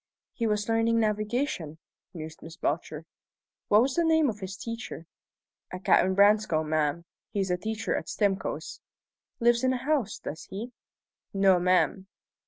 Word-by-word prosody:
"He 230 - -1
was 210 -1 0
learning 225 0 +2
navigation," 215 - -1 0.3
mused 160 -2 -8
Miss 165 0 -11
Belcher. 155 +1 -3 0.6
"What 210 +3 +5
was 265 +1 0
the 340 - +2
name 320 -3 +3
of 210 - -11
his 190 0 -6
teacher?" 230 -7 -6 0.7
"A 185 - -4
Captain 190 0 +3
Branscome, 200 -6 +3
ma'am. 155 +2 0 0.2
He's 195 -2 -1
a 180 - +1
teacher 220 +3 -2
at - - -4
Stimcoe's." 200 -3 -2 0.6
"Lives 235 0 +3
in 260 - +3
the 260 - +1
house, 280 -3 -1
does 160 +2 -7
he?" 220 +6 -7 0.6
"No, 195 -2 +5
ma'am." 185 +2 +2
205 Hz, 150 wpm, -28 LUFS, 180-230 Hz, 0.7 s, What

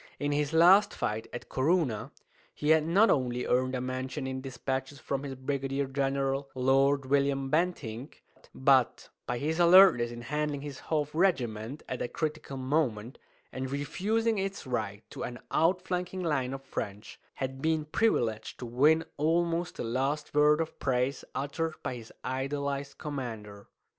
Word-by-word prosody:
In 145 0 -1
his 145 0 0
last 185 +6 +6
fight, 110 +1 -2
at 120 - -7
Corunna, 135 - +1 0.5
he 150 +1 +1
had 160 0 +4
not 200 +7 +5
only 125 -2 0
earned 130 +1 +1
a 125 - -2
mention 130 +2 -4
in 130 0 -4
despatches 135 +1 -4
from 140 -1 -3
his 140 -1 -5
brigadier 135 +1 -2
general, 135 0 -1
Lord 135 +2 +3
William 135 0 +1
Bentinck, 150 -7 -2 0.3
but 130 -2 +3 0.2
by 120 - -1
his 155 +6 -1
alertness 175 -8 +7
in 120 0 -8
handling 150 +2 -2
his 145 -2 -7
half 150 -2 -2
regiment 135 - 0
at 130 - -4
a - - -1
critical 150 0 -4
moment, 130 -4 -1 0.3
and 130 0 -4
refusing 205 - 0
its 195 -2 -3
right 110 -4 -3
to - - -8
an 120 - -4
outflanking 180 +2 0
line 135 -5 0
of 135 - -9
French, 105 -5 -6 0.2
had 135 0 -4
been 160 0 +1
privileged 120 - 0
to 125 - -6
win 150 +7 +3
almost 170 +2 +1
the - - -3
last 135 +6 -1
word 150 +1 +5
of 160 - -5
praise 130 +1 0
uttered 155 +3 -2
by - - -2
his 115 -2 -9
idolized 140 +2 -3
commander. 110 -8 -6
140 Hz, 155 wpm, -29 LUFS, 130-155 Hz, 0.5 s, alertness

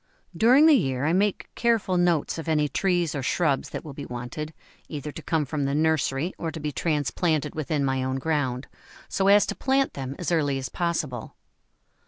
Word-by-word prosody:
During 255 +7 +6
the 320 - +7
year 135 - +1
I 160 - +2
make 200 +2 +1
careful 230 -6 +1
notes 175 -3 +1
of 160 - -7
any 150 -2 +2
trees 175 +2 0
or 145 - -2
shrubs 140 +1 0
that - - -6
will 150 - -7
be 140 +1 -7
wanted, 125 +6 -5 0.4
either 150 -1 -5
to 160 - -8
come 160 -1 0
from 145 0 -2
the 140 +1 0
nursery 155 +1 +1
or 165 - -2
to 160 - -7
be 150 0 -3
transplanted 150 +1 0
within 150 -2 -1
my 130 -1 0
own 130 0 -1
ground, 135 -3 -1 0.4
so 195 - 0
as 205 +1 +6
to - - -4
plant 270 0 +1
them 135 0 -5
as 175 -3 -3
early 145 -5 +1
as 130 -2 -4
possible. 155 -9 -3
155 Hz, 195 wpm, -25 LUFS, 135-175 Hz, 0.4 s, the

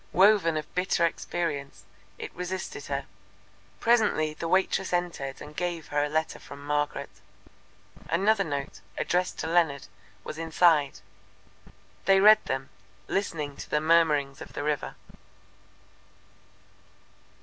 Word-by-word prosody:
Woven 190 -4 +5
of 155 - -6
bitter 180 -1 +2
experience, 160 -4 -3 0.3
it - - -7
resisted 180 -4 -5
her. 140 -1 -2 0.7
Presently 215 -10 +3
the 165 - -5
waitress 190 +1 +1
entered 170 -6 -2
and 150 - -11
gave 175 -2 -3
her 145 0 +1
a 145 - -1
letter 155 +1 -1
from 140 0 -11
Margaret. 145 -1 -2 0.9
Another 200 +4 +3
note, 140 -4 -4 0.2
addressed 180 +1 0
to - - -3
Leonard, 160 -5 +2 0.4
was 155 - -7
inside. 160 -3 +3 1.0
They 195 0 +6
read 215 +2 +7
them, 135 0 -3 0.4
listening 155 -7 -2
to - - -8
the 150 - +2
murmurings 150 -3 +3
of - - -9
the - - -4
river. 150 -2 -2
160 Hz, 120 wpm, -27 LUFS, 145-180 Hz, 1.0 s, read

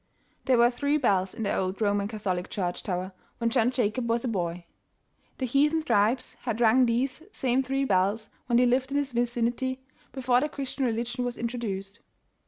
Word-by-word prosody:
There 260 -2 +4
were 240 +1 +5
three 285 +4 +1
bells 195 -9 +1
in 225 - -4
the 200 - 0
old 185 +1 -2
Roman 205 -2 +1
Catholic 195 -5 -3
Church 180 -3 -2
tower 185 0 -3 0.3
when 230 0 0
John 240 -1 +3
Jacob 235 -1 -1
was 230 +2 0
a - - 0
boy. 175 -5 -2 0.7
The 260 - -1
heathen 295 +5 +2
tribes 235 0 +1
had 235 -3 -3
rung 240 +2 +5
these 255 +5 0
same 260 -5 +1
three 270 +1 -1
bells, 200 +1 +1 0.2
when 240 -1 +3
they 250 - +5
lived 255 +2 +2
in 280 - -1
this 285 -1 -1
vicinity, 240 +2 -1 0.3
before 250 -1 +2
the 300 - 0
Christian 275 -2 -3
religion 240 +1 -1
was 245 -1 -3
introduced. 225 -4 -4
240 Hz, 185 wpm, -27 LUFS, 205-260 Hz, 0.7 s, were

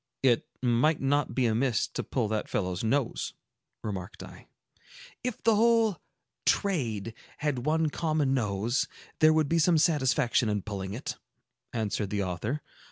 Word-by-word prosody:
"It 120 -3 +3 0.2
might 125 +6 +3
not 140 +1 +1
be 130 - +2
amiss 115 +1 +2
to - - -3
pull 120 -5 -1
that 110 -1 -2
fellow's 90 -1 -1
nose," 130 +2 0 0.5
remarked 100 -1 -5
I. - - -12 0.8
"If 250 -3 -4
the 225 -1 +5
whole 225 -3 +4 0.5
'trade' 115 - 0 0.2
had 145 -3 -2
one 160 0 +2
common 155 -4 +1
nose, 115 -1 0 0.3
there 155 0 +7
would 155 -1 +3
be 165 +3 +2
some 165 +1 +4
satisfaction 130 -7 +2
in 105 -2 -1
pulling 100 -2 -4
it," 130 - -5 0.5
answered 105 -3 -2
the 100 0 -1
author. 100 - -3
130 Hz, 145 wpm, -29 LUFS, 110-155 Hz, 0.8 s, there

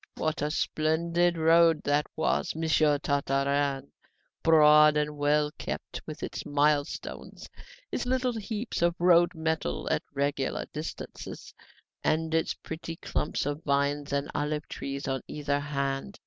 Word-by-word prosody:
"What 155 0 -2
a 150 - 0
splendid 170 +3 +1
road 165 0 +5
that 145 +1 +1
was, 160 - 0
Monsieur 155 -2 +3
Tartarin, 140 -1 0 0.5
broad 150 -1 +6
and 150 0 -1
well 150 +1 +2
kept, - - -5
with - - -7
its - - -4
mile 145 0 +2
stones, - - -8 0.4
its - - -2
little 255 -1 +1
heaps 220 -1 -4
of 170 0 +3
road 175 0 +4
metal 160 - -2
at - - +1
regular 140 -1 -1
distances, 155 +1 -7 0.5
and 160 0 0
its 160 0 +1
pretty 165 +1 -7
clumps 155 - -2
of 145 +2 -3
vines 140 +1 0
and 140 0 -1
olive 150 +1 -2
trees 140 +1 -5
on 135 -2 -1
either 145 -1 -1
hand! 140 +5 -3
150 Hz, 135 wpm, -28 LUFS, 145-165 Hz, 0.5 s, broad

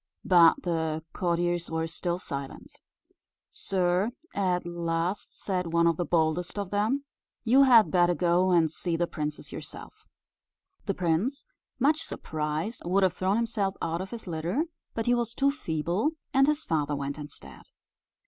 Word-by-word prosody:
But 170 -3 +6
the 160 -2 -1
courtiers 175 -1 0
were 160 0 -1
still 170 +1 -3
silent. 140 -6 -7 0.8
"Sir," 185 +2 +1 0.2
at 185 -3 0
last 170 +2 -2
said 180 -3 -2
one 170 0 +4
of 165 -2 +3
the 175 - -1
boldest 165 +3 0
of 200 -2 -3
them, 220 +7 +1 0.4
"you 250 +4 +5
had 235 -4 +6
better 175 -1 +4
go 180 +1 +2
and 165 -4 +3
see 165 +1 -2
the 175 - +1
princess 150 -3 -5
yourself." - - -10 0.8
The 195 - 0
prince, 180 - 0 0.3
much 295 +5 +2
surprised, 155 - -3
would 190 +3 +2
have 185 -2 +3
thrown 190 +2 0
himself 215 -4 0
out 165 +2 -2
of 190 - -6
his 235 -2 -7
litter; 175 - -1 0.3
but 225 - -1
he 245 - +3
was 235 -1 -1
too 280 0 +3
feeble, 175 - -1 0.2
and 270 0 +5
his 300 +1 +1
father 150 -2 0
went 140 +1 -4
instead. 145 0 -10
175 Hz, 155 wpm, -28 LUFS, 165-210 Hz, 0.8 s, But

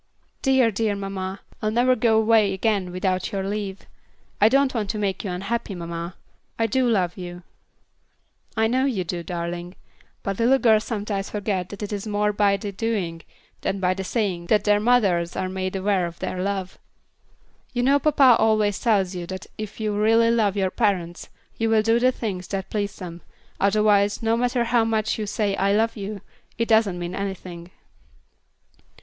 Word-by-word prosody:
"Dear, 265 -4 +3
dear 210 0 0
mamma, 195 -1 -5 0.2
I'll 215 - +1
never 245 +3 +3
go 225 -2 +3
away 220 -2 +4
again 195 -2 0
without 185 0 -1
your 195 -1 -2
leave. 200 -1 -4 0.6
I 210 - +7
don't 275 +1 +3
want 215 -5 -2
to 215 - -2
make 200 -2 -2
you 200 - -3
unhappy, 200 +3 -3
mamma. 170 0 -5 0.4
I 225 - +2
do 250 +3 +1
love 185 -5 +1
you." 175 -1 -8 1.1
"I 220 - +3
know 255 +4 +2
you 230 -9 0
do, 175 0 -4
darling; 175 +1 -5 0.5
but 195 +1 -3
little 245 +4 +4
girls 220 -4 +3
sometimes 205 -3 -3
forget 195 -3 -2
that 205 +1 -7
it 210 - -4
is 205 +1 -4
more 210 0 +1
by 200 -1 +3
the 205 -1 -5
doing 190 -6 -2 0.4
than 195 - -2
by 185 -1 +2
the 190 +1 -5
saying 190 -5 -2
that 210 +1 +3
their 205 0 +3
mothers 200 -7 +2
are 185 - -1
made 185 0 -3
aware 190 -2 +1
of 170 0 -10
their 180 - -3
love. 190 -1 -3 0.9
You 245 -1 -1
know 280 +3 +4
papa 275 -4 +5
always 215 -2 +2
tells 200 -6 +2
you 175 -1 -5
that 190 -1 -6
if 215 0 -6
you 215 -1 -1
really 225 +2 +4
love 210 -4 +2
your 190 -2 +1
parents, 185 -7 -1 0.3
you 225 0 0
will 220 -1 +4
do 225 +1 +3
the 255 +1 +4
things 195 -7 -4
that 195 -1 -4
please 205 -2 -2
them, 170 -2 -8 0.4
otherwise, 205 +1 +3
no 225 0 +2
matter 245 0 +1
how 235 0 +2
much 220 -1 0
you 210 - -3
say 205 -1 0
'I 200 +1 +2
love 225 +2 +1
you,' 205 -1 -6 0.4
it 230 -1 0
doesn't 220 -5 +3
mean 175 0 -4
anything." 185 -3 -6
205 Hz, 180 wpm, -24 LUFS, 185-225 Hz, 1.1 s, I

